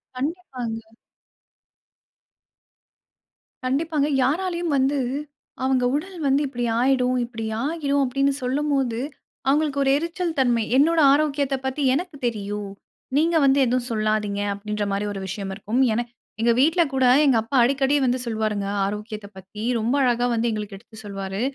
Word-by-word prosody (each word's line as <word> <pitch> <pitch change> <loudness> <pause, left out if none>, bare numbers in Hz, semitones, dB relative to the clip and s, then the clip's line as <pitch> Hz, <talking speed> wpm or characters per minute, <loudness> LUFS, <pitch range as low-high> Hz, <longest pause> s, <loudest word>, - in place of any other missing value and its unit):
கண்டிப்பாங்க. 255 -6 -4 2.8
கண்டிப்பாங்க. 290 +2 0 0.2
யாராலயும் 345 +3 0
வந்து, 275 +1 +2 0.6
"அவங்க 260 -1 +2
உடல் 360 +4 -4
வந்து 275 +1 +3
இப்படி 245 -3 -3
ஆயிடும் 255 0 +2
இப்படி 230 -2 -6 0.2
ஆகிடும்" 285 -2 0
அப்படீன்னு 275 +2 +1
சொல்லும்போது, 265 -3 0 0.5
அவங்களுக்கு 285 0 +2
ஒரு 270 - +3
எரிச்சல் 335 +2 -2
தன்மை, 240 -3 +3
"என்னோட 320 +4 +4
ஆரோக்கியத்தை 285 -2 +1
பத்தி 265 +2 -2
எனக்கு 345 +3 -2
தெரியும். 205 -3 -3 0.5
நீங்க 330 +3 +2
வந்து 275 +1 +4
எதுவும் 250 0 0
சொல்லாதீங்க" 215 -2 0
அப்படீன்ற 210 +1 -3
மாரி 200 +1 -1
ஒரு 195 - -5
விஷயம் 195 0 -5
இருக்கும். 230 +6 -1
என 240 +2 -1 0.4
எங்க 235 +1 +4
வீட்ல 325 +5 +4
கூட 260 -1 +2 0.2
எங்க 265 -5 +4
அப்பா 230 +5 -5
அடிக்கடி 270 +3 +2
வந்து 250 0 +1
சொல்வாருங்க 215 -3 -1 0.2
ஆரோக்கியத்தை 210 +1 -5
பத்தி. 195 +3 -9 0.2
ரொம்ப 230 +5 0
அழகா 245 -1 +2
வந்து 235 0 +1
எங்களுக்கு 210 -2 -5
எடுத்து 220 +2 -17
சொல்வாரு. 195 0 -5
255 Hz, 135 wpm, -23 LUFS, 215-285 Hz, 2.8 s, என்னோட